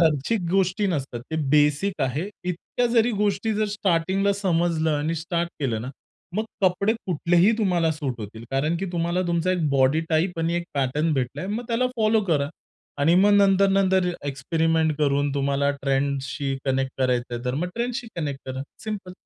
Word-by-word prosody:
खर्चिक 160 +6 +2
गोष्टी 195 +2 +2
नसतात, 135 -9 -2
ते 160 - -2
बेसिक 150 +5 +2
आहे. 140 +8 -1 0.2
इतक्या 180 +7 -1
जरी 235 +1 +4
गोष्टी 205 +1 +1
जर 215 +1 +1
स्टार्टिंगला 195 +1 +1
समजलं 170 -5 +1
आणि 155 +3 -1
स्टार्ट 170 +1 -2
केलं 115 -6 -1
ना 125 - -5 0.5
मग 215 - 0 0.2
कपडे 190 +3 +3
कुठलेही 175 +3 +3
तुम्हाला 175 -6 +2
सूट 140 -6 -4
होतील, 110 +2 -8
कारण 150 +5 0
की 195 +3 -3
तुम्हाला 170 +1 0
तुमचा 170 +1 +1
1 170 -4 0
बॉडी 135 +3 +3
टाइप 165 +2 +1
आणि 165 +1 0
1 175 0 -1
पॅटर्न 145 +4 +1
भेटलाय, 130 +7 -2
मग 220 +4 -3
त्याला 240 +2 +1
फॉलो 220 0 +3
करा 145 -6 +1 0.5
आणि 160 +4 +4
मग 200 +3 +5
नंतर-नंतर 195 -2 +4 0.2
एक्सपेरिमेंट 160 +4 +1
करून 145 -1 +1
तुम्हाला 140 0 +1
ट्रेंडशी 135 0 -1
कनेक्ट 135 -1 0
करायचंय 125 -2 0
तर 125 0 -1
मग 170 +6 -1
ट्रेंडशी 240 +1 -2
कनेक्ट 145 -5 -3
करा, 130 +1 -4 0.2
सिंपल. 205 -4 -5
165 Hz, 160 wpm, -24 LUFS, 140-195 Hz, 0.5 s, मग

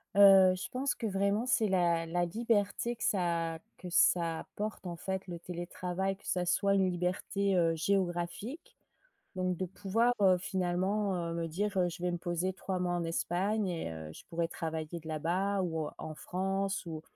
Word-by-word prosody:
Heu, 195 -2 +8
je 185 - -5
pense 265 +2 -1
que 230 - -5
vraiment 200 +3 +1
c'est 225 -4 +3
la 170 -3 +2
la 175 +1 +1
liberté 225 +3 0
que - - -7
ça 170 -4 0 0.2
que 180 - -8
ça 170 -2 +3
apporte 210 -3 -5
en 170 - -4
fait 190 +2 -4
le 175 -1 -5
télétravail, 180 +2 -3
que - - -22
ça 180 -1 0
soit 200 +3 +3
une 190 -1 +3
liberté, 185 +2 0
heu, 165 -2 +3
géographique. 185 - -2 0.6
Donc 185 -1 0
de 185 - -2
pouvoir, 220 +6 +1
heu, 185 -2 +6
finalement, 190 +2 0
heu, - - -3
me 165 0 -2
dire, 195 +5 -2
heu, 180 -1 +3
je 175 +1 -8
vais 180 - +1
me 175 - -1
poser 175 +2 -1
3 190 -1 -3
mois 175 -1 0
en 175 -1 -1
Espagne 190 +5 0
et 165 - -3
heu, 80 -1 -7
je - - -12
pourrais 165 0 -1
travailler 160 0 -4
de 160 - -15
là-bas 180 +6 0
ou, 160 -3 -1
heu, - - -5
en 155 - -6
France, 195 +1 -2
ou 160 -1 -5
180 Hz, 190 wpm, -32 LUFS, 170-195 Hz, 0.6 s, Heu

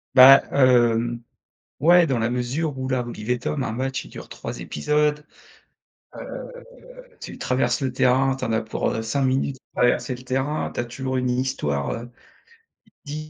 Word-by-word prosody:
Bah, 135 +2 +10
hem, 120 -3 +3 0.6
ouais, 170 +3 +6
dans 130 -4 0
la 115 +1 0
mesure 130 +5 -2
où, 130 - -3
là, 130 -1 0
Olive 120 -1 -7
et 125 - +2
Tom, 135 +3 -3
1 110 - -3
match 130 +3 -3
il - - -13
dure - - -10
3 - - -7
épisodes, 150 - 0 1.8
heu, - - -17
tu - - -9
traverses 130 +3 0
le 130 - -1
terrain, 130 +1 +2
tu 135 - -5
en 115 - -2
as 110 - +1
pour, 110 0 -2
heu, 110 - -2
5 135 +5 -1
minutes 130 +1 0 0.2
pour - - -3
traverser 125 +1 +2
le 125 - -13
terrain, 135 +4 -2
tu - - -6
as 120 - -1
toujours 130 +2 -4
une 125 0 0
histoire, 75 - -1
heu, 120 +1 -6 0.9
di 155 +1 -6
130 Hz, 180 wpm, -23 LUFS, 120-140 Hz, 1.8 s, Bah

